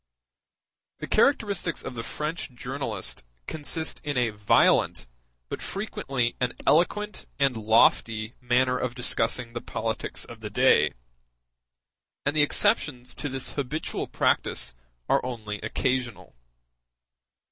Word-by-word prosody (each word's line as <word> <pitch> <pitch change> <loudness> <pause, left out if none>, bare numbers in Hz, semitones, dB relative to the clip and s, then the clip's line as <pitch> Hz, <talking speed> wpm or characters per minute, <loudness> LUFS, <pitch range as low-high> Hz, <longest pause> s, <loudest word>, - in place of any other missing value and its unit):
The - - -5
characteristics 200 - +2
of - - -5
the 115 - -4
French 150 +7 -4
journalist 125 -5 -4 0.2
consist 160 +1 -3
in 145 -3 -2
a 120 -3 +2
violent, 105 -1 +3 0.4
but - - -5
frequently 135 - -2
an 125 -1 0
eloquent 210 +6 +2
and 140 -3 +2
lofty, 110 0 +3
manner 125 +1 +2
of 125 -1 -2
discussing 115 -1 +1
the 120 - -4
politics 110 0 -3
of 115 - -11
the 110 -1 -6
day; 125 +5 +4 1.3
and 145 +2 +1
the 150 - +5
exceptions 125 -3 +2
to 145 - -4
this 130 0 -3
habitual 145 +2 -3
practice - - +1 0.3
are - - +3
only 110 -5 -5
occasional. 125 +1 -2
125 Hz, 115 wpm, -27 LUFS, 115-145 Hz, 1.3 s, the